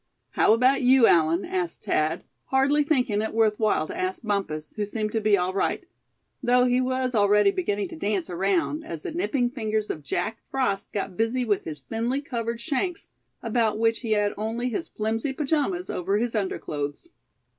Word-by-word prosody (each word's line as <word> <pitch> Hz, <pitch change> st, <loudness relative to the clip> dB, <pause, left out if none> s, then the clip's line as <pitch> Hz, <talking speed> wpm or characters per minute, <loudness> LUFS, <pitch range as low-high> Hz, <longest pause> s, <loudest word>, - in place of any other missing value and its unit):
"How -, -, +4 dB
about 255 Hz, +4 st, +3 dB
you, 255 Hz, -1 st, +6 dB
Allan?" 165 Hz, 0 st, +3 dB
asked 180 Hz, -2 st, -3 dB
Thad, 155 Hz, +1 st, 0 dB, 0.2 s
hardly 280 Hz, +3 st, +3 dB
thinking 250 Hz, -8 st, +1 dB
it 220 Hz, -, -3 dB
worth 220 Hz, -2 st, +2 dB
while 215 Hz, -7 st, +2 dB
to -, -, -7 dB
ask 185 Hz, +4 st, -3 dB
Bumpus, 195 Hz, -8 st, -2 dB
who 210 Hz, -, -2 dB
seemed 215 Hz, +1 st, -3 dB
to 225 Hz, -, -1 dB
be 210 Hz, -1 st, +4 dB
all 180 Hz, 0 st, -1 dB
right; 280 Hz, -, -1 dB, 0.6 s
though 250 Hz, 0 st, +4 dB
he 250 Hz, 0 st, +2 dB
was 255 Hz, 0 st, -1 dB
already 205 Hz, -1 st, +4 dB
beginning 205 Hz, -, -1 dB
to -, -, -8 dB
dance 195 Hz, +1 st, -1 dB
around, 200 Hz, -, 0 dB
as 330 Hz, -, -7 dB
the 365 Hz, -, -4 dB
nipping 280 Hz, -8 st, 0 dB
fingers 220 Hz, -4 st, -2 dB
of 155 Hz, -, -6 dB
Jack 175 Hz, +10 st, -2 dB
Frost 235 Hz, -7 st, -2 dB
got 195 Hz, -3 st, -4 dB
busy 230 Hz, +3 st, +1 dB
with 205 Hz, -4 st, 0 dB
his 155 Hz, -2 st, -6 dB
thinly 235 Hz, +4 st, -2 dB
covered 235 Hz, -4 st, -4 dB
shanks, 320 Hz, +8 st, -2 dB, 0.3 s
about 225 Hz, -2 st, +1 dB
which 225 Hz, 0 st, +2 dB
he 225 Hz, -3 st, -1 dB
had 205 Hz, -1 st, +1 dB
only 225 Hz, +4 st, -2 dB
his 330 Hz, +9 st, -3 dB
flimsy 225 Hz, +4 st, -2 dB
pajamas 270 Hz, -, -1 dB
over 195 Hz, +3 st, -1 dB
his 235 Hz, +1 st, -1 dB
underclothes. 150 Hz, -, -3 dB
220 Hz, 180 wpm, -25 LUFS, 200-255 Hz, 0.6 s, you